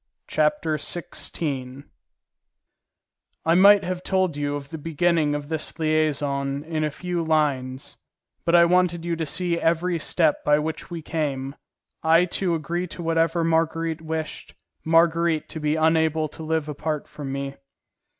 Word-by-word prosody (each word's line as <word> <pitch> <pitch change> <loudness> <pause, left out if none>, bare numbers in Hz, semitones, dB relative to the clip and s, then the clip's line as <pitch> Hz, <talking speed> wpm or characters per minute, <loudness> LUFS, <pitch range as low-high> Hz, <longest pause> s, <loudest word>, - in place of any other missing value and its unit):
Chapter 155 0 +1
XVI 140 -4 -4 1.6
I 165 - +4
might 200 +3 +7
have 180 0 -3
told 185 -4 0
you 145 0 -2
of 140 -1 -7
the 160 - -6
beginning 160 -1 +1
of 145 -1 -5
this 160 0 -3
liaison 145 -3 0
in 155 -1 -2
a 155 - +1
few 175 +3 -3
lines, 140 -5 -1 0.5
but 170 - +3
I 170 0 +7
wanted 175 -1 +2
you 170 -1 0
to 160 -1 -3
see 170 +3 -1
every 170 +1 +1
step 160 -1 +1
by 150 0 +4
which 155 +1 -4
we 170 -2 -6
came, 140 -4 -2 0.5
I 165 +2 +5 0.2
to 175 -3 +1
agree 170 +3 -3
to 175 0 -7
whatever 165 +1 +1
Marguerite 165 0 0
wished, 160 -1 -5 0.3
Marguerite 165 0 +3
to 160 - -6
be 150 0 0
unable 160 0 +2
to 160 - -10
live 160 -1 -1
apart 150 0 -3
from 140 -3 -7
me. 140 0 -4
160 Hz, 150 wpm, -24 LUFS, 150-170 Hz, 1.6 s, might